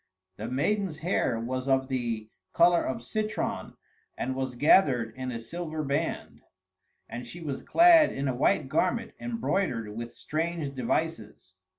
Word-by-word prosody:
The 110 - -5
maiden's 165 +6 0
hair 145 -10 +1
was 130 +3 -3
of 135 -1 +2
the 115 -5 -3 0.2
color 175 0 +5
of 120 -3 -3
citron 215 - -3 0.4
and 130 - -2
was 130 -1 -3
gathered 125 - +4
in 130 0 -4
a 115 - -4
silver 155 +6 -5
band; 145 +3 -2 0.7
and 120 +1 -7
she 175 - -9
was 150 -5 -4
clad 335 -2 +6
in 135 +1 -3
a 130 - 0
white 125 +1 +2
garment 185 - 0
embroidered 190 - -2
with 120 +1 -6
strange 160 -2 -3
devices. 125 - -3
135 Hz, 145 wpm, -28 LUFS, 120-170 Hz, 0.7 s, clad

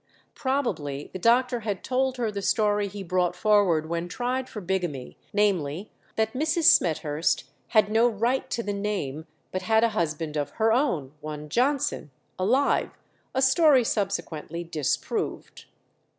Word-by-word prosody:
Probably 160 - -2
the 185 - -5
doctor 245 +4 +3
had 205 -4 -4
told 260 0 0
her 230 -3 -1
the 200 -1 -4
story 205 0 +1
he 200 0 -7
brought 180 -1 0
forward 185 -6 +3
when 170 +1 -2
tried 250 +6 -2
for 215 - -6
bigamy, 175 -8 -3 0.2
namely, 195 -3 0 0.2
that 220 0 0
Mrs. 315 +5 0
Smethurst 155 -2 0 0.2
had 215 -2 +3
no 225 +2 +4
right 235 +4 -1
to 235 - -2
the 205 - -2
name, 195 -8 -3 0.2
but 185 - -2
had 220 +3 +3
a 230 - +4
husband 160 -6 -2
of 145 -1 -1
her 220 0 +3
own, 180 - 0
one 150 0 -7
Johnson, 255 - 0 0.3
alive 250 +10 +1 0.4
a 265 - +2
story 265 -1 +5
subsequently 175 -6 -2
disproved. 155 -5 -3
205 Hz, 145 wpm, -26 LUFS, 165-240 Hz, 0.4 s, story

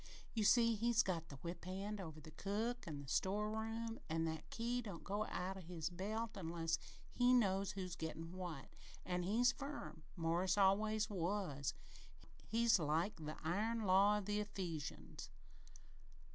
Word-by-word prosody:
"You 220 -3 +1
see, 230 +2 +6
he's 230 +2 +3
got 165 -4 -2
the 140 - -7
whip 170 +5 -6
hand 195 +3 -3
over 160 -4 -7
the 155 +1 -11
cook 220 +8 -2
an' 145 -3 -4
the - - -11
sto'eroom, 220 - -1
an' 165 +1 +1
that 160 -1 -4
key 240 +2 -1
don't 200 -8 -7
go 205 +2 -1
out 190 +2 -3
o' - - -7
his 165 -1 -4
belt 215 +5 -2
unless 165 -3 -1 0.3
he 245 0 +5
knows 195 -4 +3
who's 185 -3 -4
gettin' 160 0 -5
what 175 -7 -5 0.4
an' 180 0 0
he's 230 +8 +4
firm. 280 - -6
Morris 175 +3 +1
always 215 +2 +4
was. 175 - -1 0.7
He's 230 -2 +4
like 160 +6 +1
the 155 -1 -5
iron 215 +7 0
law 200 +2 +6
of 205 - -3
the 205 +1 0
Ephesians." 175 - -4
195 Hz, 155 wpm, -40 LUFS, 165-215 Hz, 0.7 s, see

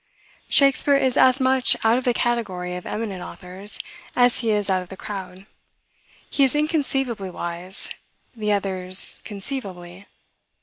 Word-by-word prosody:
Shakspeare 280 0 +4
is 260 -2 +2
as 260 +1 +5
much 260 -1 +3
out 225 +2 +4
of 255 - -8
the 245 - +3
category 190 -7 -1
of 180 - -7
eminent 210 -4 -4
authors, 190 +4 -6 0.4
as 245 0 +4
he 230 - -1
is 210 -2 +1
out 190 -2 +1
of 180 - -11
the 190 - -9
crowd. 190 -2 -7 0.8
He 280 - +1
is 270 +1 +2
inconceivably 270 - -1
wise; 175 +2 -3 0.5
the 210 -2 -1
others, 190 -2 +3
conceivably. 195 -4 -7
210 Hz, 140 wpm, -23 LUFS, 185-255 Hz, 0.8 s, as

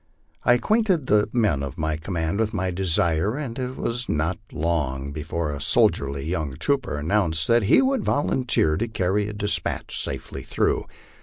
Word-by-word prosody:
I 120 - +5
acquainted 185 - +2
the 105 -2 +3
men 105 - +1
of 70 -2 -5
my 80 -1 -1
command 80 +3 -2
with 110 0 0
rny 95 -2 -1
desire, 90 +2 +1
and 130 -5 -5
it 130 0 -3
was 120 +1 -3
not 80 +3 0
long 70 -4 -1
before 80 +1 -3
a 70 -1 -5
soldierly 70 0 +2
young 80 -5 -2
trooper 135 - 0
announced 80 -1 +1
that 120 0 +5
he - - +6
would 265 0 +1
volunteer 125 - +1
to 115 - -1
carry 100 -1 0
a 105 - -5
despatch 105 0 -2
safely 65 - -4
through. - - 0
95 Hz, 165 wpm, -24 LUFS, 80-115 Hz, -, he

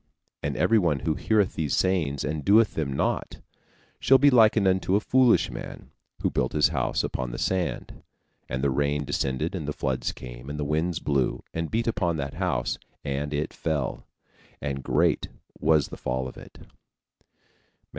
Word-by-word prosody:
And - - -2
everyone 90 -10 +3
that 80 +4 -2
heareth 105 -4 +2
these 75 -3 -1
sayings, 80 -7 +1
and 75 0 -3
doeth 105 +5 +5
them 75 -4 -2
not, 65 - -2 0.6
shall 135 - +6
be 145 +1 +5
likened 110 -4 +5
unto 95 0 +2
a - - +4
foolish 125 +1 +3
man, - - -8 0.3
who - - +2
built - - -1
his 75 0 +4
house 65 -6 0
upon 65 -1 -3
the - - -6
sand; 95 -2 -2 0.5
and 65 +1 -3
the 70 - +2
rain 70 +1 0
descended, 70 +4 -1
and 80 -6 -4
the 75 - -2
floods 65 -3 -2
came, - - -10
and 75 +1 -5
the 75 - -1
winds 80 +3 0
blew, 70 -6 0
and 80 0 -2
beat 115 +1 0
upon 95 -8 0
that 70 -2 -4
house; - - -1 0.2
and 70 +1 -2
it 75 +1 -2
fell: 75 -5 -3 0.5
and 70 -2 -3
great - - +2 0.3
was 80 -3 +3
the - - -8
fall 65 +1 -2
of 65 - -10
it" - - -13
(Matt. - - -15
75 Hz, 175 wpm, -26 LUFS, 70-95 Hz, 0.6 s, shall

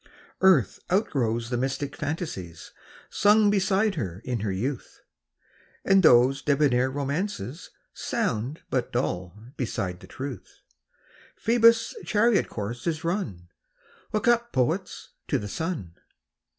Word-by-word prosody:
TRUTH. 185 - +4
ARTH - - -10
outgrows 120 - 0
the 120 - 0
mythic 135 +3 -2
fancies 95 - -5 0.4
Sung 210 0 +4
beside 200 +1 +2
her 95 - -4
in 125 -2 -2
her 105 -1 -2
youth; 120 +7 -4 0.8
And 195 0 +5
those 130 -2 +5
debonair 135 -3 +2
romances 145 - -3 0.2
Sound 120 +8 -2
but 125 -2 -1
dull 90 -6 -2 0.2
beside 90 -6 -3
the - - -13
truth. 135 -1 -8 0.7
Phoebus' 230 0 +4
chariot 215 0 +2
course 115 +5 -5
is 160 -1 -1
run! 125 - -3 0.6
Look 215 +2 -1
up, 240 0 +3
poets, 125 -2 -1 0.2
to - - +1
the 105 - -5
sun 150 - -4
140 Hz, 120 wpm, -26 LUFS, 115-190 Hz, 0.8 s, And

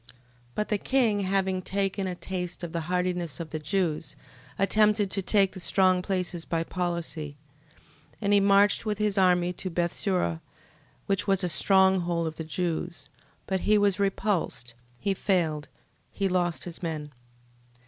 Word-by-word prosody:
13:18. - - -17 0.4
But 210 - -1
the 210 - +2
king 235 -5 +2
having 190 -1 0
taken 195 +1 -1
a 180 - -3
taste 180 -1 -4
of 170 - -4
the 170 - -2
hardiness 180 -5 -1
of 165 -2 -6
the 155 - -3
Jews, 160 0 -1 0.4
attempted 210 0 +3
to 195 - 0
take 195 0 +3
the 185 - -9
strong 185 0 +3
places 180 -2 -2
by 165 -1 -1
policy: 165 -4 -3 0.8
13:19. - - -28
And 205 -1 +2
he 205 - +6
marched 200 +1 +4
with 210 -2 -1
his 210 -2 +1
army 180 -1 +3
to 185 - -5
Bethsura, 170 - -1 0.6
which 195 +1 -1
was 195 -1 +3
a 180 - +1
strong 190 +5 +4
hold 170 -1 -1
of 160 -1 -4
the 160 - -4
Jews: 165 -2 -3 0.4
but 190 -1 -1
he 210 +3 +3
was 205 -1 +2
repulsed, 190 - -1 0.2
he 200 +6 0
failed, 165 -7 0 0.4
he 195 - -1
lost 175 -2 0
his 175 -2 -8
men. 155 -4 -4
185 Hz, 165 wpm, -27 LUFS, 170-195 Hz, 0.8 s, he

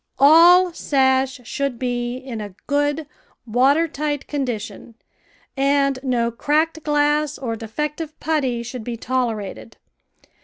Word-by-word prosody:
All 340 +5 +7
sash 265 -3 +1
should 275 +1 -3
be 245 0 -2
in 255 -4 -7
a 205 -3 -8
good 290 +2 0 0.4
water 270 +8 +3
tight 295 -1 -3
condi 260 -6 -2
tion, 220 +2 -10 0.6
and 275 0 +2
no 240 -3 0
cracked 310 +6 0
glass 295 0 +1
or 235 -4 -3
defective 300 +8 -5
putty 265 -7 -1
should 240 0 -7
be 235 +1 -5
tolerated. 225 -4 -3
270 Hz, 120 wpm, -21 LUFS, 240-295 Hz, 0.6 s, All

